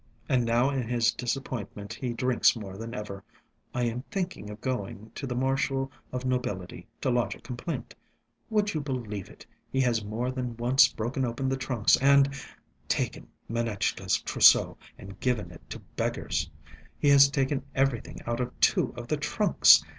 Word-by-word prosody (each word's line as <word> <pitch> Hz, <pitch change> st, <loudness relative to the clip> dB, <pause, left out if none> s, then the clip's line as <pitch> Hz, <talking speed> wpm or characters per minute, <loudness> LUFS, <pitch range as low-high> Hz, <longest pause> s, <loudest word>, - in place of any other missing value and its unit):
And 125 Hz, -4 st, +2 dB
now 120 Hz, +4 st, +3 dB
in 130 Hz, -4 st, -2 dB
his 120 Hz, -2 st, +2 dB
disappointment 120 Hz, -4 st, -4 dB
he 125 Hz, -2 st, -3 dB
drinks 125 Hz, +1 st, +3 dB
more 100 Hz, -4 st, -7 dB
than 115 Hz, +4 st, -6 dB
ever. 100 Hz, -3 st, -6 dB, 0.5 s
I 125 Hz, -, -1 dB
am 120 Hz, +1 st, -1 dB
thinking 185 Hz, -, -3 dB
of 105 Hz, +1 st, -8 dB
going 110 Hz, -4 st, -4 dB
to 140 Hz, -, -5 dB
the 125 Hz, -, -3 dB
Marshal 135 Hz, +1 st, 0 dB, 0.2 s
of 125 Hz, 0 st, -4 dB
Nobility 105 Hz, -10 st, -3 dB
to 130 Hz, -, +1 dB
lodge 120 Hz, -1 st, +1 dB
a -, -, -15 dB
complaint. 125 Hz, +8 st, -5 dB, 0.6 s
Would 210 Hz, -2 st, +1 dB
you 155 Hz, -, -1 dB
believe 120 Hz, -8 st, -4 dB
it, -, -, -15 dB, 0.3 s
he 135 Hz, -, 0 dB
has 120 Hz, -4 st, +1 dB
more 115 Hz, +5 st, -2 dB
than 125 Hz, -3 st, -4 dB
once 125 Hz, +4 st, +5 dB
broken 120 Hz, +4 st, -2 dB
open 125 Hz, +2 st, -1 dB
the 135 Hz, -, +1 dB
trunks 125 Hz, -5 st, +2 dB
and... 140 Hz, 0 st, +5 dB, 0.5 s
taken -, -, -1 dB, 0.2 s
Manetchka's 110 Hz, -5 st, 0 dB
trousseau -, -, +5 dB, 0.2 s
and 95 Hz, 0 st, -11 dB
given 110 Hz, -8 st, -1 dB
it 85 Hz, -, -13 dB
to -, -, -5 dB
beggars. -, -, -3 dB, 0.5 s
He 145 Hz, -, +2 dB
has 140 Hz, 0 st, +8 dB
taken 135 Hz, -1 st, 0 dB
everything 135 Hz, -3 st, 0 dB
out 120 Hz, +1 st, -2 dB
of 125 Hz, 0 st, -4 dB
two -, -, +3 dB
of -, -, -6 dB
the -, -, 0 dB
trunks! -, -, +5 dB
125 Hz, 170 wpm, -28 LUFS, 115-135 Hz, 0.6 s, has